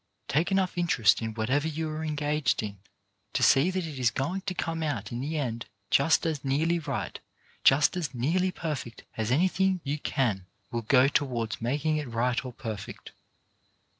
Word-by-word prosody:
Take 160 +7 +1
enough 190 -2 +1
interest 145 -13 +3
in 110 -1 -4
whatever 130 +7 +1
you 160 0 -2
are 155 +1 -4
engaged 150 -5 0
in 100 -2 -6 0.5
to - - +1
see 140 +7 +5
that 185 -2 -2
it 150 -4 -6
is 125 -2 +4
going 170 +10 -2
to 185 - -1
come 165 -1 -2
out 140 -10 -2
in 120 - -3
the 155 +4 -2
end 120 -5 -3 0.2
just 155 +5 +4
as 155 -4 -1
nearly 160 +5 +1
right, 145 -5 -4 0.4
just 145 +5 +5
as 175 -4 -2
nearly 160 +9 +1
perfect, 150 -10 -5
as 110 -1 -2
anything 185 +6 +2
you 145 +2 -2
can 125 -9 0
do 95 - -17 0.3
will 115 - -1
go 130 +3 +5
towards 120 -6 -1
making 150 +6 0
it 150 -2 -3
right 120 +2 0
or 130 - -6
perfect. 110 -4 -7
145 Hz, 180 wpm, -28 LUFS, 120-160 Hz, 0.5 s, see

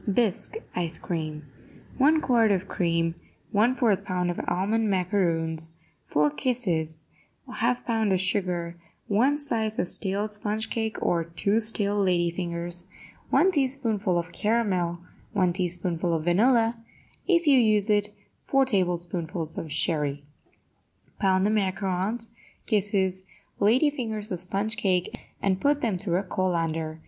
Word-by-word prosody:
BISQUE 235 - 0
ICE 170 -2 +1
CREAM 155 -3 -4 0.5
1 305 +4 +4
quart 235 -6 +3
of 190 -2 0
cream 165 -3 0 0.4
1/4 225 -1 +2
pound 180 -1 -1
of 175 - -5
almond 210 +4 +1
macaroons 165 -4 0 0.3
4 150 0 +2
kisses 160 - -2 0.4
1/2 245 0 -1
pound 225 -3 +1
of 185 - +2
sugar 180 -3 -1 0.3
1 250 +8 +3
slice 225 -7 -1
of 175 - 0
stale 200 +3 0
sponge 210 +1 -3
cake 220 -1 -2
or 170 -1 +1
2 185 +6 0
stale 215 -2 +1
lady 175 -3 +2
fingers 170 0 -5 0.4
1 380 - +4
teaspoonful 250 - 0
of 170 +1 -3
caramel 195 -6 0 0.4
1 185 -4 +2
teaspoonful 175 -1 -1
of 155 - -2
vanilla 225 +6 +3 0.5
If 345 -3 +3
you 280 -3 +6
use 215 -3 +3
it, 205 -1 +2 0.3
4 270 -1 +2
tablespoonfuls 175 -6 -1
of 160 - -6
sherry 145 -2 0 1.0
Pound 190 -1 +3
the 210 - +2
macaroons, 195 +2 -1 0.4
kisses, 195 -3 +1 0.4
lady 250 +9 +4
fingers 220 -7 -2
or 180 - -1
sponge 195 +5 -2
cake, 180 -3 0 0.3
and 190 -1 +1
put 290 0 +2
them 215 -7 0
through 175 -2 0
a 190 - -1
colander. 165 -4 -2
195 Hz, 135 wpm, -26 LUFS, 175-220 Hz, 1.0 s, you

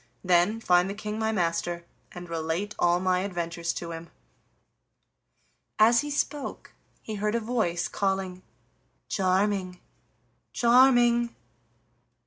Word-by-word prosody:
Then 180 +4 +3
find 180 -3 +3
the 200 - -4
King 215 0 -5
my 220 0 0
master, 170 -2 -1 0.3
and 175 0 -9
relate 165 +5 -3
all 175 0 +3
my 185 0 +1
adventures 170 -3 -3
to 170 -1 -6
him." 165 0 -8 1.7
As 230 +3 +5
he 295 - -5
spoke 290 -1 -3 0.3
he 220 - -6
heard 210 +1 0
a - - +2
voice 215 -7 -1
calling: 190 -2 -2 0.7
"Charming, 190 -1 0 0.7
Charming!" 240 -1 +4
190 Hz, 115 wpm, -27 LUFS, 175-220 Hz, 1.7 s, As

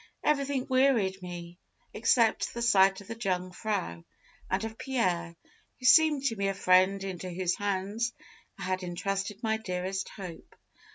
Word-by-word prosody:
Everything 280 -3 +1
wearied 255 -8 +2
me, 175 0 -8 0.3
except 230 -2 +2
the 235 - -3
sight 195 -3 +4
of 200 - -14
the 230 - -4
Jungfrau 185 - -3 0.5
and 190 +3 0
of 225 0 -5
Pierre, 180 -10 -1 0.4
who 255 - -8
seemed 300 +1 +6
to 235 -5 0
me 200 -1 -1
a 195 - -1
friend 185 +1 +4
into 185 -1 -5
whose 180 0 -1
hands 205 +4 -1 0.5
I 195 - -7
had 185 +1 -1
entrusted 195 +4 -3
my 220 -1 +1
dearest 190 -2 -3
hope. 180 -5 -10
195 Hz, 150 wpm, -29 LUFS, 185-230 Hz, 0.5 s, seemed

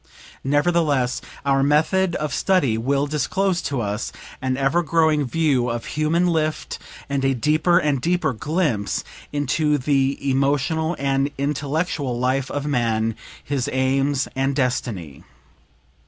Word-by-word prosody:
Nevertheless 145 -3 +1 0.2
our 135 -1 +3
method 160 +6 +2
of 150 -3 -2
study 165 - +2
will 135 +5 +1
disclose 175 +5 0
to 135 -4 -2
us 105 0 -3 0.3
an 130 0 -1
ever 140 +6 +2
growing 160 -2 +2
view 135 -4 +1
of 115 -1 -3
human 155 +3 +2
lift, 155 -3 -1 0.3
and 140 -1 -1
a 135 0 +2
deeper 155 +7 +3
and 145 -5 +1
deeper 170 -2 +1
glimpse 145 - -1 0.3
into 145 +1 +1
the 135 0 +1
emotional 145 +5 +1
and 135 0 +1
intellectual 145 -1 -1
life 130 +2 0
of 145 0 -3
man, 115 -5 0 0.3
his 135 -3 -2
aims 135 +1 +1
and 135 +1 0
destiny. 120 - -2
140 Hz, 125 wpm, -22 LUFS, 130-155 Hz, 0.3 s, our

